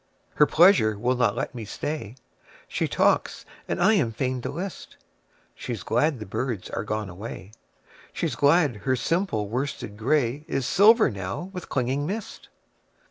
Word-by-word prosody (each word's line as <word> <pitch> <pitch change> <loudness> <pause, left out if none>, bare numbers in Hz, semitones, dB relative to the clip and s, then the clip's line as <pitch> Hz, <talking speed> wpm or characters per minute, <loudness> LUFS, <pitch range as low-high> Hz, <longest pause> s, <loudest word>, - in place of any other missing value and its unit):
Her 150 - +4
pleasure 160 - +5
will 125 +4 +1
not 120 -4 +2
let 135 +4 -3
me 120 -3 -6
stay. 130 +2 -5 0.5
She - - -1
talks - - +1 0.2
and - - -2
I 195 +5 +5
am 145 - +2
fain 130 +2 -2
to - - -4
list:She's 125 - -9
glad 150 -2 +1
the 110 - -7
birds 115 -1 -4
are - - -3
gone 105 0 -3
away, 100 +1 -8 0.6
She's - - -2
glad 145 -4 +3
her 130 +5 0
simple 140 - -1
worsted 120 -3 -4
grayIs 135 +3 0
silver 210 - +5
now 100 - -5
with 180 -2 -7
clinging 135 +3 -1
mist. 210 +4 -6
130 Hz, 145 wpm, -25 LUFS, 110-160 Hz, 0.6 s, pleasure